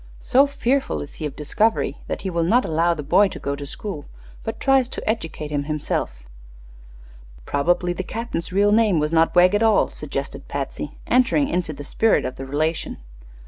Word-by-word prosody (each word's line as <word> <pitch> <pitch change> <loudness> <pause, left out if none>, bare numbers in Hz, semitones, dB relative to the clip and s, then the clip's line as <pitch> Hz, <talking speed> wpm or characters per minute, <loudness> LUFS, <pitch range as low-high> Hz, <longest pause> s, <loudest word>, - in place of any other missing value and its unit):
So 275 +3 +4
fearful 275 -1 0
is 145 - -11
he 155 - 0
of 140 - -10
discovery 210 +9 0
that - - -3
he 190 - -2
will 170 -1 0
not 230 +10 +3
allow 165 +2 +2
the 150 - -5
boy 200 +8 +4
to - - -8
go 140 0 -3
to 140 0 -7
school, 165 -2 -6 0.4
but - - -5
tries 270 -2 +3
to - - -6
educate 165 -8 -3
him 145 -1 -1
himself." 145 - -3 1.2
"Probably 175 +4 +1
the 180 - -3
captain's 225 -3 -4
real 200 +2 +3
name 215 -4 +4
was 150 +1 0
not 165 +1 +3
Wegg, 180 +2 +6
at 205 - +2
all," 225 -1 +3
suggested - - -5
Patsy, - - -5
entering 255 +3 +3
into 175 -3 -1
the 145 -1 -8
spirit 220 +9 +2
of 130 - -4
the 135 - -6
relation. 155 +4 -1
175 Hz, 185 wpm, -22 LUFS, 150-225 Hz, 1.2 s, Wegg